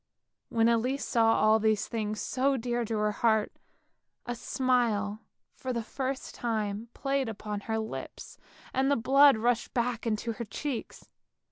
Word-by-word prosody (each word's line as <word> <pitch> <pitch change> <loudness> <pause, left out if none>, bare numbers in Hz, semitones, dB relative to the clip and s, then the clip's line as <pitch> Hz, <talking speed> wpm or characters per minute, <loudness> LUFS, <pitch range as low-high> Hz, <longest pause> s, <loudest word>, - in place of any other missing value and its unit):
When 225 -1 +3
Elise 245 +4 +1
saw 225 -2 +3
all 215 +1 +4
these 215 -1 +1
things 215 -2 -3
so 270 +1 +1
dear 240 0 -1
to 220 0 -2
her 210 0 +1
heart, 220 0 +1 0.7
a 245 - -2
smile 230 -5 0 0.3
for 260 - -5
the 235 -2 -2
first 265 +3 -4
time 220 -1 -2
played 275 -3 -1
upon 210 -1 -5
her 220 +2 -3
lips, 220 0 -6 0.3
and 265 +1 +2
the 285 - +4
blood 275 +2 +6
rushed 235 +1 0
back 240 -1 -1
to 230 +2 -3
her 235 +1 -5
cheeks. 245 +4 -5
230 Hz, 150 wpm, -29 LUFS, 220-255 Hz, 0.7 s, blood